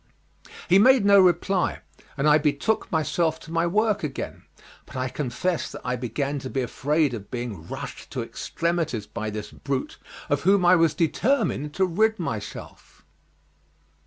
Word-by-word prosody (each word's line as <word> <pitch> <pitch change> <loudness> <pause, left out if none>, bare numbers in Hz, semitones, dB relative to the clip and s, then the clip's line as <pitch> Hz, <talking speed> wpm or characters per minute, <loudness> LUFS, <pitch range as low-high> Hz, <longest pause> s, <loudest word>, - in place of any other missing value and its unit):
He 185 +2 +6
made 255 0 +6
no 200 0 +7
reply, 180 0 +2 0.4
and 140 +2 +1
I 150 0 +6
betook 150 +9 0
myself 160 0 0
to 160 - -11
my 165 +1 +1
work 210 +2 +1
again, 145 -3 -5 0.5
but - - -13
I 130 0 -1
confess 150 +7 -2
that - - -8
I 125 0 0
began 135 +4 -2
to 130 - -6
be 135 -1 -1
afraid 145 +3 0
of 105 -4 -7
being 115 -10 -5
rushed - - -7
to - - -2
extremities 165 -10 -2
by 110 0 -5
this 105 0 -6
brute, 135 -1 -4 0.3
of 145 - 0
whom 195 0 +3
I 180 +1 +7
was 165 -3 +3
determined 165 - 0
to 190 - +3
rid 220 +5 +2
myself. 110 - -7
155 Hz, 160 wpm, -25 LUFS, 130-180 Hz, 0.5 s, no